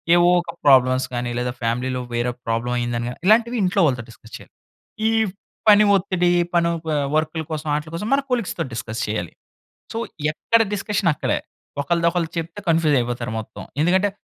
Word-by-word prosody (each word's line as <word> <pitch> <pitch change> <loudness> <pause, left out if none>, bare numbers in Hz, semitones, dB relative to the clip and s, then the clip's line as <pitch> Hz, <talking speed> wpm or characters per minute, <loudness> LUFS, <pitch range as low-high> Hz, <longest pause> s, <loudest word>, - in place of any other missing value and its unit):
ఏవో 175 0 +5
ఒక - - -7
ప్రాబ్లమ్స్ 130 -2 +5
గానీ, 120 0 -2
లేదా 125 0 -1
ఫ్యామిలీలో 125 +2 -1
వేరే 120 +1 0
ఒక 125 - -31
ప్రాబ్లమయిందని 120 0 -1
గానీ, 125 - -9
ఇలాంటివి 235 +3 +4
ఇంట్లో 190 +2 +2
వాళ్ళతో 125 -5 0
డిస్కస్ 110 0 -17
చెయాలి. - - -17 0.6
ఈవ్ 220 -3 +1 0.4
పని 210 0 +8
ఒత్తిడి 180 -2 +1 0.2
పనౌ 170 -1 +2
ప - - -9 0.3
వర్కుల 155 +1 0
కోసం, 155 0 -4
ఆటిలి 150 +1 -4
కోసం 210 +5 -4
మన 275 - +3
కొలీగ్స్‌తో 235 -6 -1
డిస్కస్ 115 0 -4
చెయ్యాలి. 105 -6 -3 0.6
సో, 225 - -3 0.3
ఎక్కడ 230 +8 +2
డిస్కషనక్కడే. 200 -7 0 0.4
ఒకళ్ళది 170 +4 +1
ఒకళ్ళకు 175 -2 -2
చెప్తే 165 +5 -6
కన్‌ఫ్యూజయిపోతారు 125 -7 +1
మొత్తం. 110 0 -9 0.2
ఎందుకంటే, 185 +5 +3
155 Hz, 155 wpm, -22 LUFS, 120-180 Hz, 0.6 s, పని